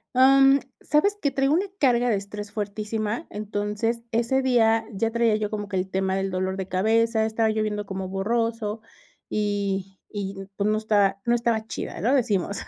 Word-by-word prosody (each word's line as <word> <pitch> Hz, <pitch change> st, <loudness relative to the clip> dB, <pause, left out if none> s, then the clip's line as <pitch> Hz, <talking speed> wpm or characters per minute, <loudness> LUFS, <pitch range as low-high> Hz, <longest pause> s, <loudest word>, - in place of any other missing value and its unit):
Am, 270 Hz, +1 st, +6 dB, 0.2 s
¿sabes 400 Hz, +8 st, +2 dB
qué?, 285 Hz, -, +1 dB
traigo 270 Hz, +2 st, +2 dB
una 370 Hz, +5 st, +2 dB
carga 245 Hz, -3 st, +3 dB
de 215 Hz, -, +3 dB
estrés 205 Hz, +1 st, -6 dB
fuertísima, 215 Hz, +4 st, -3 dB
entonces 210 Hz, +2 st, -2 dB
ese 235 Hz, +4 st, +1 dB
día 225 Hz, -3 st, +3 dB
ya 225 Hz, +3 st, 0 dB
traía 230 Hz, -2 st, +2 dB
yo 210 Hz, -1 st, -1 dB
como 205 Hz, -1 st, -4 dB
que 205 Hz, -, -5 dB
el 185 Hz, +1 st, -2 dB
tema 190 Hz, 0 st, 0 dB
del 195 Hz, 0 st, -1 dB
dolor 185 Hz, +1 st, -2 dB
de 190 Hz, -1 st, -4 dB
cabeza, 220 Hz, +4 st, +2 dB
estaba 220 Hz, 0 st, +1 dB
yo 215 Hz, 0 st, 0 dB
viendo 210 Hz, -1 st, -2 dB
como 190 Hz, -1 st, -5 dB
borroso 220 Hz, +2 st, -1 dB, 0.5 s
y 200 Hz, -2 st, -1 dB, 0.2 s
y, 200 Hz, -1 st, -4 dB, 0.2 s
pues, 200 Hz, +1 st, 0 dB
no 215 Hz, -, +2 dB
estaba 205 Hz, -3 st, +2 dB
no 240 Hz, 0 st, +3 dB
estaba 230 Hz, -2 st, 0 dB
chida, -, -, -5 dB
¿no?, 245 Hz, +9 st, +2 dB
decimos. 200 Hz, -5 st, 0 dB
215 Hz, 180 wpm, -25 LUFS, 200-235 Hz, 0.5 s, Am